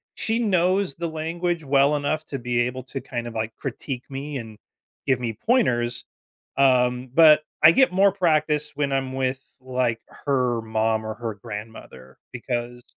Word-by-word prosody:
she 225 Hz, +1 st, -1 dB
knows 185 Hz, -, +1 dB
the 170 Hz, 0 st, -3 dB
language 165 Hz, +1 st, -2 dB
well 140 Hz, +1 st, +3 dB
enough 155 Hz, +2 st, -1 dB
to 140 Hz, -, -5 dB
be 120 Hz, 0 st, 0 dB
able 125 Hz, +2 st, -2 dB
to 135 Hz, -, -5 dB
kind 120 Hz, -1 st, -5 dB
of, 115 Hz, -, -8 dB
like, 110 Hz, 0 st, -3 dB
critique 130 Hz, -1 st, -5 dB
me 140 Hz, +1 st, -5 dB
and 110 Hz, -3 st, -8 dB, 0.5 s
give 130 Hz, -2 st, +2 dB
me 115 Hz, -2 st, -1 dB
pointers, 120 Hz, -, +1 dB, 0.5 s
um, 125 Hz, -2 st, +3 dB
but 155 Hz, -1 st, +7 dB, 0.2 s
I 160 Hz, -, +10 dB
get 265 Hz, +2 st, +4 dB
more 195 Hz, +1 st, +5 dB
practice 155 Hz, -5 st, +1 dB
when 145 Hz, -1 st, -1 dB
I'm 135 Hz, -1 st, -1 dB
with, 130 Hz, 0 st, -1 dB, 0.2 s
like, 125 Hz, -3 st, -1 dB, 0.2 s
her 125 Hz, -4 st, +1 dB
mom 110 Hz, 0 st, 0 dB
or 110 Hz, -, -3 dB
her 115 Hz, -3 st, -5 dB
grandmother 105 Hz, -, -10 dB, 0.2 s
because 120 Hz, 0 st, -4 dB
130 Hz, 160 wpm, -24 LUFS, 120-155 Hz, 0.5 s, I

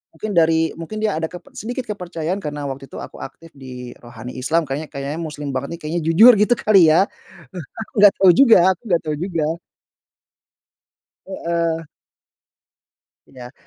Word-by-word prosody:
mungkin 215 Hz, -, -5 dB
dari 160 Hz, -2 st, +2 dB
mungkin 170 Hz, +6 st, -7 dB
dia 215 Hz, -, +1 dB
ada 160 Hz, -, -2 dB
keper 180 Hz, +1 st, -13 dB
sedikit 245 Hz, +4 st, -5 dB
kepercayaan 180 Hz, -2 st, -4 dB
karena 150 Hz, -5 st, -6 dB
waktu 135 Hz, 0 st, -8 dB
itu -, -, -14 dB
aku -, -, -11 dB
aktif 165 Hz, 0 st, -11 dB
di 125 Hz, -2 st, -10 dB
Rohani 120 Hz, 0 st, -10 dB
Islam, 160 Hz, +6 st, +1 dB
kayaknya 145 Hz, +3 st, -4 dB
kayaknya 140 Hz, +3 st, -5 dB
muslim 150 Hz, -2 st, -6 dB
banget, 130 Hz, +1 st, -3 dB
nih, -, -, -25 dB
kayaknya 160 Hz, +3 st, -3 dB
jujur, 215 Hz, +10 st, +8 dB
gitu, 210 Hz, +3 st, +4 dB
kali, 210 Hz, -2 st, +5 dB
ya. 155 Hz, -, +4 dB, 0.8 s
Aku 220 Hz, -, -7 dB
nggak 205 Hz, -1 st, +7 dB
tau 190 Hz, -, +5 dB
juga 255 Hz, -1 st, +6 dB, 0.2 s
aku 175 Hz, -, -23 dB
nggak 170 Hz, -3 st, +2 dB
tau 155 Hz, -1 st, -2 dB
juga. 170 Hz, -4 st, -2 dB, 1.8 s
Heeh. 170 Hz, -3 st, -2 dB, 1.4 s
Iya. 125 Hz, -1 st, -12 dB
165 Hz, 160 wpm, -20 LUFS, 145-185 Hz, 1.8 s, jujur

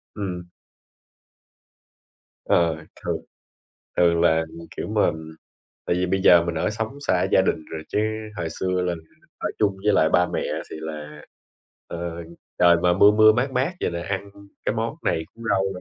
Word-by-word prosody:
Ừm. 90 Hz, -4 st, -5 dB, 2.0 s
Ờ, 80 Hz, -2 st, +2 dB, 0.2 s
thường -, -, 0 dB, 0.8 s
thường 85 Hz, -1 st, +4 dB
là, 80 Hz, -1 st, +3 dB, 0.3 s
kiểu -, -, -4 dB
mà 105 Hz, -4 st, +3 dB, 0.8 s
tại -, -, +1 dB
vì 90 Hz, +1 st, +1 dB
bây 95 Hz, +1 st, 0 dB
giờ 85 Hz, -3 st, +7 dB
mình 85 Hz, -1 st, -2 dB
ở 80 Hz, -, 0 dB
sống 110 Hz, +5 st, -4 dB
xa 90 Hz, -1 st, +3 dB
gia -, -, +6 dB
đình 80 Hz, -4 st, -1 dB
rồi, 80 Hz, -1 st, -5 dB
chứ -, -, -1 dB, 0.4 s
hồi 85 Hz, -, -2 dB
xưa 90 Hz, +2 st, -1 dB
là 90 Hz, -1 st, 0 dB, 0.4 s
ở -, -, -2 dB
chung 100 Hz, -2 st, +2 dB
với 105 Hz, -, +3 dB
lại 80 Hz, -4 st, +4 dB
ba 90 Hz, +2 st, +3 dB
mẹ -, -, 0 dB, 0.3 s
thì -, -, -7 dB
là, 75 Hz, -1 st, -7 dB, 0.7 s
ờ, 85 Hz, 0 st, -5 dB, 0.4 s
trời 85 Hz, -1 st, +7 dB
mà 90 Hz, 0 st, +4 dB
mưa 100 Hz, +3 st, +7 dB
mưa 110 Hz, 0 st, +7 dB
mát 120 Hz, +5 st, 0 dB
mát 130 Hz, +7 st, 0 dB
vậy -, -, -1 dB
là 85 Hz, -, -4 dB
ăn 100 Hz, +1 st, -4 dB, 0.3 s
cái -, -, 0 dB
món -, -, -2 dB
này 80 Hz, -, 0 dB
cuốn 115 Hz, -, -11 dB
rau 95 Hz, -, +3 dB
nữa, 90 Hz, -, -7 dB
90 Hz, 175 wpm, -24 LUFS, 85-100 Hz, 2.0 s, giờ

